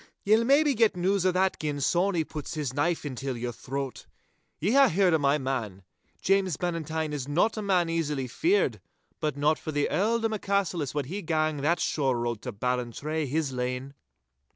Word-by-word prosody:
'Ye'll 215 +3 +4
maybe 285 +3 +4
get 225 -5 +3
news 185 +1 +2
o' - - +4
that 190 +1 +1
gin 150 -2 -2
Sawny 175 +4 +2
puts 150 0 -7
his 145 -5 -2
knife 160 +3 0
intil 135 -2 -4
your 120 +1 -3
throat. 135 +3 -5 0.5
Ye 190 +7 +1
hae 275 +2 +6
heard 180 0 +3
o' 160 - +3
my 140 0 +3
man. 120 -9 -3 0.4
James 190 -5 +2
Bannatyne 160 -3 -2
is 140 -3 -4
not 175 +10 +2
a 215 - -3
man 185 -4 +2
easily 150 -5 -1
feared, 355 - +1 0.4
but 150 -3 -2
not 150 +2 +2
for 155 - -5
the 145 -1 +1
Earldom 225 +2 +1
o' 215 - -2
Cassillis 180 -9 -1
wad 145 -3 -1
he 190 +9 -5
gang 155 -2 0
that 155 +5 +1
shore 135 -5 0
road 120 -2 -2
to 125 - -5
Ballantrae 125 +7 -2
his 150 +1 -1
lane. 125 +2 -3
155 Hz, 185 wpm, -27 LUFS, 135-185 Hz, 0.5 s, hae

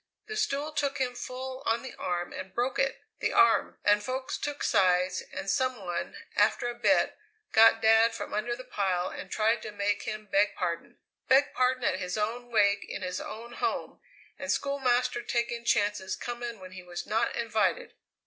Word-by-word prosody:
The 430 - -6
stool 300 -7 -1
took 280 -2 -1
him 255 -2 0
full 255 +1 -6
on 230 +2 +1
the 260 - -7
arm 175 -1 -3
and 185 0 -7
broke 250 +3 0
it 270 0 0 0.2
the - - 0
arm 390 -1 +4
and 205 0 +5
folks 260 +4 -3
took 290 0 -3
sides, 180 -1 +3
and - - -6
some 255 +4 +1
one, 175 -1 -3 0.2
after 215 +3 +3
a 240 - -2
bit, 240 - +2 0.3
got 225 0 +6
Dad 225 +1 +5
from - - -6
under 240 +3 -1
the 255 - -9
pile 190 -7 -1
and - - -8
tried 220 +1 +2
to 215 - -6
make 205 0 0
him 215 -1 -5
beg 205 +1 +2
pardon! 170 -2 -3 0.3
Beg 270 +2 +4
pardon 255 0 +1
at 190 - +1
his 180 +1 -3
own 235 +3 -2
wake 200 -3 +3
in 200 - -5
his 180 0 -3
own 230 +2 -8
home, 390 +9 -2 0.4
and 275 -1 -2
Schoolmaster 250 -3 +1
taking 235 -1 -2
chances 205 -4 +1
coming 240 -2 -5
when 185 0 -10
he 185 0 -9
was 175 -1 -6
not 220 +1 0
invited! 230 - 0
230 Hz, 185 wpm, -29 LUFS, 200-255 Hz, 0.4 s, got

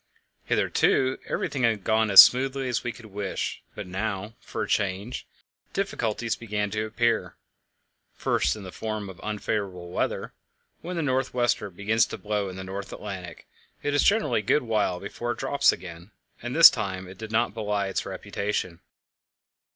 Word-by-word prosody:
Hitherto 130 0 +2
everything 140 - -2
had 115 -5 +2
gone 110 +1 +2
as 100 - +9
smoothly 135 +1 +1
as 125 -2 -1
we 120 - -2
could 115 0 -13
wish, 100 -2 -4
but - - -6
now, 100 +2 -3
for - - -5
a - - -4
change, 100 +4 -2 0.5
difficulties 115 - -1
began 105 -2 -3
to 110 +1 -2
appear, 115 +1 0 0.8
first - - +1
in 105 - -9
the 95 - -8
form 110 -2 -4
of 95 - -15
unfavourable 100 -4 -3
weather - - -2 0.5
When 180 +2 -5
the 165 - -1
north 130 -2 0
wester 120 -4 +1
begins 105 +5 +1
to - - -6
blow 105 -1 -2
in 90 - -8
the 95 - -6
North 95 +1 -6
Atlantic, 95 -4 -7 0.4
it 145 - 0
is 145 - +4
generally 200 - +3
a - - -5
good 140 +8 +2
while 105 -6 0
before 120 +5 -4
it - - -13
drops 140 - +3
again, 85 +1 -9 0.3
and 120 +2 -4
this 165 - +11
time 95 -2 -4
it 95 +1 -12
did 110 -1 -7
not 115 +2 +1
belie 105 -2 -1
its 95 - -2
reputation. 100 -4 -3
110 Hz, 170 wpm, -26 LUFS, 95-120 Hz, 0.8 s, this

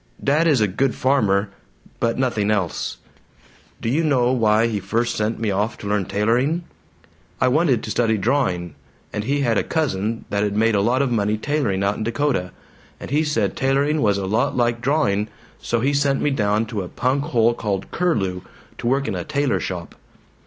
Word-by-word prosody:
Dad 150 +4 +3
is 140 -8 +3
a 105 - +4
good 120 +7 0
farmer, 105 -7 +2 0.5
but 115 0 0
nothing 115 -5 0
else. 100 -6 -1 0.8
Do - - -3
you 145 +8 +1
know 130 -5 +2
why 110 -3 +3
he 110 -3 -1
first 115 +5 -1
sent 105 +2 -1
me 110 -3 0
off 105 +4 -1
to 100 - -7
learn 100 -2 0
tailoring? 125 - +1 0.8
I 130 - +3
wanted 145 -2 +2
to 110 - -4
study 110 -2 +1
drawing, 95 - 0 0.4
and 105 - -3
he 140 +3 0
had 115 -5 +2
a - - 0
cousin 115 - -1
that'd 100 0 0
made 115 +1 +3
a 100 - +2
lot 125 +6 +2
of 130 - -1
money 105 -2 +1
tailoring 110 -7 -1
out 100 +1 0
in - - -3
Dakota, 115 -5 0 0.5
and - - -8
he 150 +2 +2
said 115 - 0
tailoring 140 +3 +1
was 100 -2 +2
a 100 - -2
lot 110 +9 0
like 120 -1 +1
drawing, 120 -7 +1 0.3
so 115 -1 -1
he 140 +3 +1
sent 140 -1 +2
me 145 - +1
down 105 -3 +1
to 110 -2 -4
a 90 - -6
punk 135 +3 0
hole 120 -6 +3
called 100 -4 -3
Curlew, 100 - 0 0.4
to - - -3
work 135 +3 +1
in - - -1
a - - -3
tailor 145 -3 0
shop. 90 -2 -5
115 Hz, 195 wpm, -21 LUFS, 105-140 Hz, 0.8 s, a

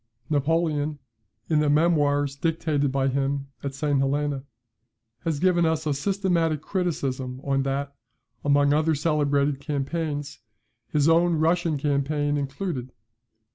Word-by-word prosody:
Napoleon, 150 0 +1 0.5
in 155 -2 +2
the 150 -1 +2
memoirs 145 -3 +2
dictated 155 -2 0
by 135 0 +1
him 135 +1 -1
at 140 -1 -4
St. 145 -1 +1
Helena, 140 0 0 0.8
has 160 -3 0
given 175 -1 +3
us 160 -1 +1
a 150 - +1
systematic 170 -1 0
criticism 135 -9 -2
on 135 -1 +1
that, 140 +1 -2 0.5
among 145 0 +4
other 155 +1 +2
celebrated 145 -2 +1
campaigns, 145 0 -3 0.5
his 150 -1 +1
own 170 +1 +4
Russian 165 0 +1
campaign 145 +1 0
included. 140 -2 -3
145 Hz, 120 wpm, -25 LUFS, 140-160 Hz, 0.8 s, among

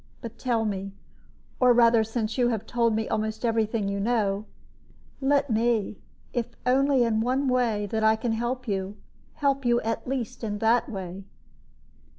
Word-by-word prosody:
But 230 -1 -9
tell 235 -3 0
me 195 -1 -3 0.7
or 250 -1 +6
rather, 230 -1 +5
since 225 0 -3
you 245 -2 +2
have 225 -3 -2
told 235 -2 +1
me 220 0 -1
almost 220 +2 -2
every 225 -2 +2
thing 215 -2 -2
you 200 0 -2
know 210 -2 0 0.8
let 280 -1 +2
me, 220 -2 0 0.3
if 240 0 -3
only 265 0 +3
in 220 -2 +1
one 260 +4 0
way 235 -5 +1
I 220 0 +3
can 225 +1 -2
help 240 +3 -2
you, 195 0 -3 0.4
help 275 -2 0
you 240 -1 +3
at 225 +2 -3
least 250 -2 -4
in 205 -2 -2
that 225 +4 +2
way." 190 -3 -6
230 Hz, 165 wpm, -26 LUFS, 215-245 Hz, 0.8 s, or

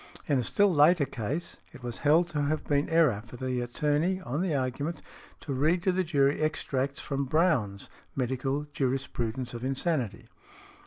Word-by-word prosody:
In 140 -3 +2
a - - 0
still 200 - +3
later 150 +1 +5
case, 135 +8 -4 0.2
it 125 - -13
was 120 -1 -4
held 155 +4 +4
to 150 -3 -1
have 150 +2 -1
been 145 0 +1
error 155 -11 +3
for 120 +1 -11
the 130 0 -2
attorney, 150 +8 0
on 145 0 -2
the 180 -5 0
argument, 140 +5 -2 0.4
to 140 - -4
read 155 +7 +2
to 185 - +3
the 185 +1 +1
jury 145 -4 +2
extracts 140 -2 -1
from 140 -1 -2
Browne's 130 - +1 0.3
"Medical 135 +3 -1
Jurisprudence 130 -3 -2
of 120 0 -6
Insanity." 130 - -1
140 Hz, 165 wpm, -29 LUFS, 125-160 Hz, 0.4 s, later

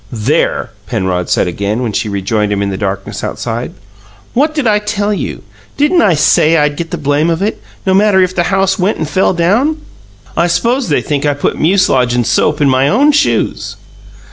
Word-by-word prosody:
"There!" 110 -3 -1 0.2
Penrod 90 -1 -2
said - - +1
again, 100 +7 -2
when 115 -4 -3
she 105 - -2
rejoined 105 +1 -1
him 100 0 0
in 100 - -2
the - - -3
darkness 95 0 -4
outside. - - -4 0.6
"What 300 +5 +1
did 295 -4 -1
I 210 -2 +3
tell 210 0 -2
you? - - -5 0.3
Didn't 300 +5 +3
I 175 -5 +3
say 155 +2 +3
I'd 150 -1 +1
get 165 +2 -5
the 175 - -4
blame 145 +2 0
of 165 +3 -1
it, 210 - -2 0.2
no 190 - +2
matter 200 0 +4
if 185 0 +1
the 175 - +1
house 195 0 +1
went 190 +4 0
and 155 - -3
fell 190 +3 +1
down? 225 - +1 0.6
I 170 +2 +2
s'pose 235 +7 0
they 145 - +1
think 145 0 -1
I 145 - +1
put 145 - -2
mucilage 145 -9 +2
and 120 -1 +1
soap 150 +6 +1
in 145 - +4
my 130 0 +2
own 275 - +3
shoes." 290 - 0
165 Hz, 200 wpm, -13 LUFS, 125-205 Hz, 0.6 s, matter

